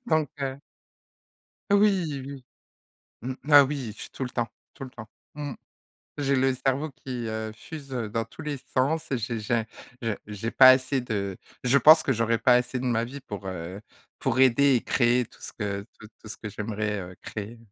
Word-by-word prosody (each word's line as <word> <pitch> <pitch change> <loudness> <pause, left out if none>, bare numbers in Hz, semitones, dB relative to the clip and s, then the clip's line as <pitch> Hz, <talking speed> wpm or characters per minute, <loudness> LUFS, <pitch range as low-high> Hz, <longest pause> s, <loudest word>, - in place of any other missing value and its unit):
donc 155 - +2
heu 135 -1 -2 1.1
Oui, 190 -9 +3
oui. 140 -2 -8 0.8
Mmh. 130 +3 -4 0.2
Ah, 145 -1 +10
oui, 135 -6 -4
je - - -14
suis - - -9
tout - - -7
le 125 - -5
temps, 120 -2 -1 0.2
tout - - -8
le 130 - -9
temps. 110 -2 -10 0.3
Mmh. 145 -2 -5 0.7
J'ai 140 -1 +2
le 130 0 +3
cerveau 135 +4 -1
qui, 125 -3 -6
heu, 110 0 -3
fuse, 140 +4 -10
heu, 120 -4 -2
dans 115 +2 -1
tous - - -11
les 145 -2 -3 0.2
sens 155 +5 +1
et 130 - 0
j'ai 115 0 -3
j'ai 115 +1 0 0.4
j'ai 110 -3 -1
j'ai 105 +2 -4
pas 130 +1 +8
assez 130 +1 +3
de 100 -6 -3 0.3
je 130 +3 +5
pense 155 +3 +8
que 135 - +1
j'aurais 115 -1 +1
pas 125 +2 +5
assez 125 +1 +1
de 125 - -4
ma 115 -2 +1
vie 135 +4 -8
pour, 100 -6 -8
heu, 90 +2 -6 0.4
pour 120 - 0
aider 130 +1 +5
et 120 - +2
créer 120 0 +2
tout - - -20
ce - - -8
que 100 -2 -3 0.2
tout 110 - -11 0.2
tout 110 - -11
ce - - -7
que 110 - -7
j'aimerais, 105 0 -3
heu, 90 0 -9
créer. 110 +2 -7
125 Hz, 205 wpm, -26 LUFS, 110-140 Hz, 1.1 s, Ah